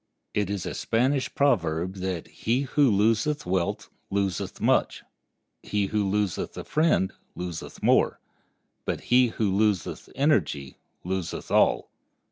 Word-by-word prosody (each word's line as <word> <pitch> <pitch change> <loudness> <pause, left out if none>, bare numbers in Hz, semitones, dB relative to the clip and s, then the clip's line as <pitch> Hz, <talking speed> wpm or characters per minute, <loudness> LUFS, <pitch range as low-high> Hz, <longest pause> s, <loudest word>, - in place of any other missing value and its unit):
It 105 -2 0
is 100 -3 -3
a - - -3
Spanish 130 +4 0
proverb 95 - +1
that 95 -3 -3
"he 120 +4 -1
who 140 0 +3
loseth 115 +8 +2
wealth 90 -1 -1 0.2
loseth 100 -3 -2
much; - - +1 0.6
he 105 -1 -1
who 105 -1 0
loseth 100 -3 -1
a - - -4
friend 155 - +2 0.2
loseth 90 -3 -6
more; - - +3 0.6
but - - -2
he 125 0 +6
who 110 -3 -1
loseth 105 -4 0
energy 90 - +1 0.2
loseth 95 -1 -4
all." - - +3
100 Hz, 125 wpm, -26 LUFS, 90-125 Hz, 0.6 s, he